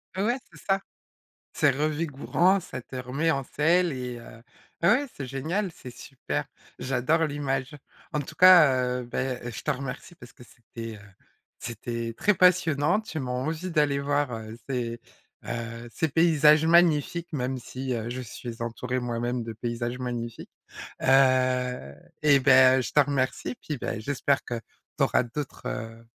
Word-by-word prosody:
M 195 - 0
ouais, 240 +4 +1
c'est - - -15
ça. 195 0 +2 0.8
C'est - - +4
revigorant. 155 +5 +1
Ça 145 -7 -7
te 130 - -10
remet 135 +6 -1
en 135 -3 -1
selle 170 +5 +2
et 125 -2 -5
heu, 115 0 -13 0.4
beh, 170 - +3
ouais, 280 +7 +4
c'est 135 - -6
génial, 165 +10 -2
c'est 125 - -10
super. 75 - -5 0.3
J'adore 135 +6 +1
l'image. 140 -1 -3 0.4
En 150 - 0
tout 140 - -8
cas, 175 -7 +8 0.3
heu, - - -7
beh 125 +1 -3
et 120 - -5
je 110 - -7
te - - -1
remercie 135 +6 -5
parce 125 -6 -14
que 125 - -16
c'était, 115 -2 -9
heu, - - -14 0.6
c'était 115 0 -5
très 210 - +3
passionnant. 180 -1 +3
Tu 170 -8 -6
m'en 125 0 -2
envie 165 +4 -3
d'aller 145 -3 +2
voir, 145 -1 0
heu, 110 0 -7
ces, 120 -3 -3 0.4
heu, 115 0 -5
ces 160 - 0
paysages 155 0 +5
magnifiques, 170 0 +3
même 130 -2 -2
si, 130 +1 -5
heu, 115 0 -3
je 130 +1 -4
suis 115 0 -8
entourée, 125 +2 -3
moi-même, 120 0 -2
de 115 0 -6
paysages 120 +2 -4
magnifiques. 120 -2 -5 0.5
Heu, 130 - +2 0.3
eh 145 -2 +5
ben, 130 -1 +6
je 115 - -5
te 150 - +3
remercie 140 - 0
puis 150 -3 -4
beh, 110 -2 -4
j'espère 140 +3 0
que 120 - -3 0.4
tu - - +2
auras - - +3
d'autres, 130 +3 -6
heu, 115 -1 -6
130 Hz, 165 wpm, -26 LUFS, 120-150 Hz, 0.8 s, cas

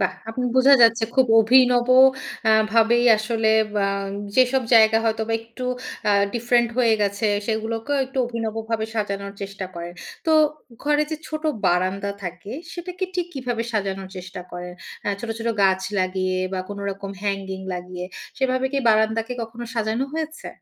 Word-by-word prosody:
বাহ! 185 -1 +1 0.2
আপনি 250 +3 -3
বুঝা 270 +2 +7
যাচ্ছে 230 0 +5
খুব 260 -1 +4
অভিনব 245 +1 +4 0.6
আ - - +6 0.2
ভাবেই 230 +1 +4
আসলে 220 0 0 0.3
বা 200 -1 +1 0.5
যেসব 255 0 +4
জায়গা 220 0 +6
হয়তোবা 225 0 0
একটু 230 +3 -9 0.4
আ - - +4 0.2
ডিফরেন্ট 240 0 +2
হয়ে 230 -3 +4
গেছে 200 +1 0 0.2
সেগুলোকেও 225 +4 -2
একটু 265 +1 -6
অভিনবভাবে 225 -1 -3
সাজানোর 200 -2 -3
চেষ্টা 195 -1 -5
করেন। 170 0 -6 0.3
তো 320 - +3 0.5
ঘরে 295 0 +2
যে 315 - -2
ছোট 310 0 -5 0.2
বারান্দা 185 +3 +1
থাকে 180 +3 -7 0.2
সেটাকে 360 +2 -5
ঠিক 355 -1 -1
কীভাবে 245 -3 -2
সাজানোর 195 -3 -2
চেষ্টা 185 0 -7
করেন? 180 0 -7 0.3
আ - - +1
ছোট, 235 - -5
ছোট 230 0 -2
গাছ 190 -1 +3 0.2
লাগিয়ে 185 0 0
বা 190 - -2
কোনরকম 200 -1 -5
হ্যাঙ্গিং 195 -2 -3
লাগিয়ে 180 0 -6 0.3
সেভাবে 260 0 +1
কি 280 - +1
বারান্দাকে 220 +2 +2
কখনো 230 +1 -7
সাজানো 225 +2 0
হয়েছে? 315 0 -5
225 Hz, 150 wpm, -23 LUFS, 195-245 Hz, 0.6 s, বুঝা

